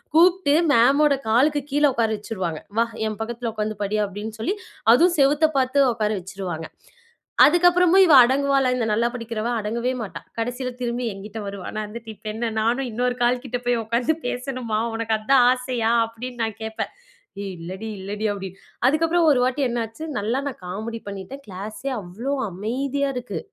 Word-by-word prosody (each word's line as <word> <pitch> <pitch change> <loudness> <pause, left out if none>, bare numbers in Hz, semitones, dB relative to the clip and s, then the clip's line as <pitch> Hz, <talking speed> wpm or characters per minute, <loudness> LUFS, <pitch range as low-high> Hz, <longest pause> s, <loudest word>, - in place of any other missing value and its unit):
கூப்ட்டு 345 -3 +5 0.2
மேமோட 280 +4 +5
காலுக்கு 285 +5 +3
கீழ 295 - +2
ஒக்கார 225 -1 +1
வச்சிருவாங்க. 185 -7 -4 0.2
"வா, 230 - +4 0.2
என் 215 -2 -5
பக்கத்துல 235 +1 -3
உக்காந்து 215 0 -2
படி." 205 +2 -1
அப்படின்னு 205 +3 -6
சொல்லி, 385 - 0 0.4
அதுவும் 345 +5 +4
செவுத்த 295 +3 +4
பாத்து 260 +2 +2
ஒக்கார 215 -2 -1
வச்சிருவாங்க. 180 -3 -6 0.8
அதுக்கப்புறமும் 355 +4 +5
இவ 320 - +5
அடங்குவாளா, 275 +1 +2
இந்த 240 -3 0
நல்லா 230 +3 +2
படிக்கிறவ? 230 -2 -4
அடங்கவே 235 +4 -1
மாட்டா. 210 - -6 0.2
கடசில 245 +2 -2
திரும்பி, 240 0 -2
என்கிட்ட 205 +3 -8
வருவா. 200 -2 -6
நான் 215 -1 -3
வந்துட்டு, 225 +1 -9
"இப்ப - - -38
என்ன? 230 +1 -2
நானும் 245 +4 +1
இன்னொரு 245 +2 0
கால் 245 +1 +2
கிட்ட 250 -1 -3
போய் 240 -1 +2
ஒக்காந்து 235 +7 0
பேசணுமா? 245 -4 -3 0.2
உனக்கு 225 -1 0
அதான் 245 +3 +4
ஆசையா?" 250 -3 0 0.2
அப்படின்னு 240 +2 -7
நான் 220 -1 -3
கேப்பேன். 220 0 -4 0.5
"ஏய், 195 - -5
இல்லடி, 190 +6 -6
இல்லடி." 205 +3 -3
அப்படின்னு. 195 -1 -8 0.3
அதுக்கப்புறம் 325 +3 +3
ஒரு 255 - +3
வாட்டி 260 +3 0
என்ன 235 -1 -1
ஆச்சு, 310 +9 -9
நல்லா 230 +6 -1
நான் 250 - -11
காமெடி 220 +5 -5
பண்ணிட்டேன். 200 +8 -8
கிளாஸே 210 +8 -6
அவ்வளவு 230 +10 -4
அமைதியா 270 +8 -2
இருக்கு. 205 -8 -4
235 Hz, 165 wpm, -23 LUFS, 215-270 Hz, 0.8 s, கூப்ட்டு